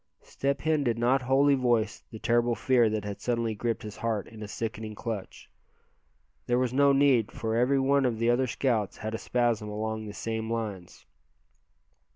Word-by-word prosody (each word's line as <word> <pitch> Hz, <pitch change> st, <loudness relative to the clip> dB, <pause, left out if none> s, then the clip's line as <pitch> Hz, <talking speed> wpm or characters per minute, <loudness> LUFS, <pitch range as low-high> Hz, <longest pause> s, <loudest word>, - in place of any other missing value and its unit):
Step 140 Hz, 0 st, -2 dB
Hen 155 Hz, -2 st, +1 dB
did 120 Hz, -3 st, 0 dB
not 125 Hz, +3 st, +2 dB
wholly 135 Hz, +3 st, +3 dB
voice 120 Hz, -4 st, +1 dB
the 110 Hz, -, -8 dB
terrible 120 Hz, +1 st, +1 dB
fear 120 Hz, -3 st, +3 dB
that 105 Hz, -1 st, -2 dB
had 100 Hz, -1 st, -6 dB
suddenly 115 Hz, -2 st, -1 dB
gripped 115 Hz, +2 st, -2 dB
his 105 Hz, -1 st, -8 dB
heart 110 Hz, -3 st, -2 dB
in 110 Hz, -1 st, -12 dB
a 105 Hz, -, -5 dB
sickening 110 Hz, 0 st, -5 dB
clutch. 110 Hz, -3 st, -6 dB, 1.0 s
There 120 Hz, -, +2 dB
was 125 Hz, -1 st, 0 dB
no 140 Hz, +1 st, +5 dB
need, 135 Hz, -5 st, +3 dB
for 110 Hz, 0 st, -3 dB
every 125 Hz, +4 st, +3 dB
one 140 Hz, +1 st, +3 dB
of 120 Hz, -3 st, 0 dB
the 115 Hz, +1 st, +2 dB
other 130 Hz, +2 st, +1 dB
scouts 115 Hz, -5 st, -1 dB
had 110 Hz, 0 st, -5 dB
a 110 Hz, -, -3 dB
spasm 120 Hz, -3 st, 0 dB
along 110 Hz, +1 st, -3 dB
the 105 Hz, -, -7 dB
same 110 Hz, 0 st, -3 dB
lines. 105 Hz, -6 st, -5 dB
115 Hz, 185 wpm, -28 LUFS, 110-130 Hz, 1.0 s, no